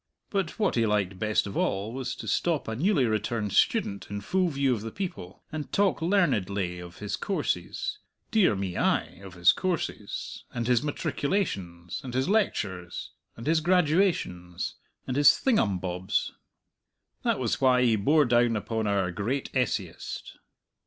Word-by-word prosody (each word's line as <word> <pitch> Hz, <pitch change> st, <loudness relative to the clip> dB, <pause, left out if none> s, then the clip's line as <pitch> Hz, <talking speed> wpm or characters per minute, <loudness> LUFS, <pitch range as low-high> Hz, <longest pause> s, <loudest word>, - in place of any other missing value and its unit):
But 195 Hz, -2 st, -1 dB
what 210 Hz, -4 st, +2 dB
he 115 Hz, -2 st, +2 dB
liked 100 Hz, -3 st, 0 dB
best 110 Hz, -1 st, +1 dB
of 100 Hz, -, -6 dB
all 100 Hz, +4 st, 0 dB
was 130 Hz, -1 st, -3 dB
to -, -, -8 dB
stop 165 Hz, -6 st, 0 dB
a 110 Hz, -, -2 dB
newly 155 Hz, -, +2 dB
returned 110 Hz, -1 st, -1 dB
student 100 Hz, 0 st, +2 dB
in 100 Hz, 0 st, -3 dB
full 185 Hz, -, +1 dB
view 140 Hz, -3 st, +1 dB
of 110 Hz, -, -3 dB
the 115 Hz, -, -5 dB
people, 140 Hz, -, -6 dB
and 155 Hz, -2 st, -5 dB
talk 200 Hz, -4 st, +2 dB
learnedly 100 Hz, -, +1 dB
of 90 Hz, 0 st, -10 dB
his 105 Hz, -1 st, -3 dB
courses 395 Hz, -, -2 dB, 0.3 s
dear 210 Hz, -, +4 dB
me, 95 Hz, -2 st, -3 dB
ay -, -, 0 dB
of 95 Hz, -2 st, -10 dB
his 90 Hz, +1 st, +6 dB
courses, 170 Hz, -, -3 dB
and 120 Hz, -1 st, -1 dB
his 125 Hz, -1 st, +3 dB
matriculations, 100 Hz, -, -2 dB
and 125 Hz, -2 st, -6 dB
his 130 Hz, +1 st, +1 dB
lectures, 95 Hz, -, -1 dB, 0.3 s
and 115 Hz, -, -8 dB
his 160 Hz, +1 st, +3 dB
graduations, 155 Hz, -, +1 dB, 0.3 s
and 125 Hz, -, -3 dB
his 145 Hz, -1 st, +6 dB
thingumbobs. 95 Hz, -, 0 dB, 0.9 s
That -, -, +1 dB
was -, -, -1 dB
why 125 Hz, -1 st, +5 dB
he 115 Hz, -3 st, +4 dB
bore 145 Hz, +9 st, +4 dB
down 120 Hz, -1 st, +3 dB
upon 110 Hz, +1 st, -2 dB
our 100 Hz, -3 st, +1 dB
great 115 Hz, +9 st, -2 dB
essayist. 110 Hz, -8 st, -3 dB
115 Hz, 155 wpm, -28 LUFS, 100-160 Hz, 0.9 s, his